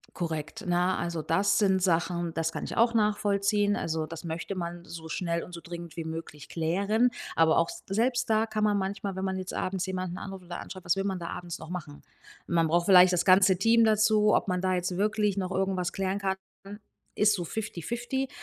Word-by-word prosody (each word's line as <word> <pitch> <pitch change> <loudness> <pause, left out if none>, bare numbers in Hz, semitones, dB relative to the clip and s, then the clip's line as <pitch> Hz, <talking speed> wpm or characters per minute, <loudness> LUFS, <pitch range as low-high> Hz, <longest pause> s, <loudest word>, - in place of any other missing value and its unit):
Korrekt, 160 -3 -4
ne? 180 +1 +2
Also, 170 -2 -3
das 195 +4 +2
sind 190 -3 +2
Sachen, 175 -1 0
das 165 0 -1
kann - - -4
ich - - -6
auch 230 +1 +3
nachvollziehen. 205 -1 +2
Also, 160 -1 -2
das 165 +2 -9
möchte 170 +4 -4
man 175 -1 -5
so 160 -1 -9
schnell 170 0 -2
und 180 - -13
so 170 - -7
dringend 170 -2 -8
wie 165 - -4
möglich 160 -2 -7
klären. 200 +9 +1 0.3
Aber, 160 -1 +4
auch 170 - +2
s - - -9
selbst 240 +5 +1
da 220 0 +3
kann 215 -1 -1
man 210 -1 +3
manchmal, 195 0 -3
wenn 190 - -3
man 190 0 -1
jetzt 185 0 -6
abends 185 0 -2
jemanden 185 -1 -4
anruft 195 -2 -8
oder 175 0 -6
anschreibt, 185 -1 -9
was 175 - +2
will 195 - -1
man 190 -2 -1
da 170 - -5
abends 175 -1 -6
noch 160 +1 -10
machen? 155 -5 -7 0.4
Man 165 -1 +2
braucht 170 +2 +2
vielleicht 185 -1 +7
das 175 -1 +1
ganze 190 0 +6
Team 230 +4 +4
dazu, 215 -1 +4
ob - - +1
man 180 -1 0
da 185 0 +1
jetzt 180 0 -2
wirklich 210 0 +1
noch 185 -1 -2
irgendwas 190 -2 -1
klären 195 0 -1
kann, 190 -1 -1 0.3
dann 205 +2 -9 0.4
ist 210 0 +4
so 180 -4 -2
fifty-fifty. 235 - -3
185 Hz, 215 wpm, -28 LUFS, 170-205 Hz, 0.4 s, vielleicht